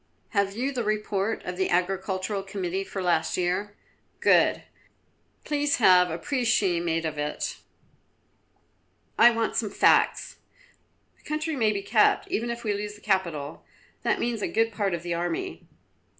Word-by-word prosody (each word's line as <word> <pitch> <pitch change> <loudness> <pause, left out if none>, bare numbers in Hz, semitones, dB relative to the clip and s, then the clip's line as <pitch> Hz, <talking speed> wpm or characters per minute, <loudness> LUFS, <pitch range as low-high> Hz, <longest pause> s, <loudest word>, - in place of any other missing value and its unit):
"Have 200 -1 0
you 265 +3 -1
the 250 -3 -2
report 210 0 -1
of 180 0 -5
the 190 - 0
Agricultural 190 +2 -1
Committee 195 -1 -3
for 195 -1 -5
last 175 -3 +1
year? 185 +3 -1 0.4
Good, - - +3 0.8
please 290 -1 0
have 180 -5 +5
a 160 - -3
précis 220 -6 +1
made 165 -1 -1
of 155 -2 -3
it; 150 0 -3 1.6
I 235 +2 +9
want 230 -1 -1
some 215 - 0
facts. - - +2 0.8
The - - -29
country 305 +1 -2
may 220 -5 +2
be 200 -1 -3
kept, 215 +1 +3
even 235 +2 -1
if 235 0 -5
we 210 -2 0
lose 205 +1 -5
the 210 - -17
capital; 170 -8 -2 0.4
that - - 0
means 235 -2 -2
a - - 0
good 225 +1 +1
part 200 -4 -1
of 170 - -8
the 175 -1 -2
army." 170 0 -3
200 Hz, 155 wpm, -26 LUFS, 180-225 Hz, 1.6 s, I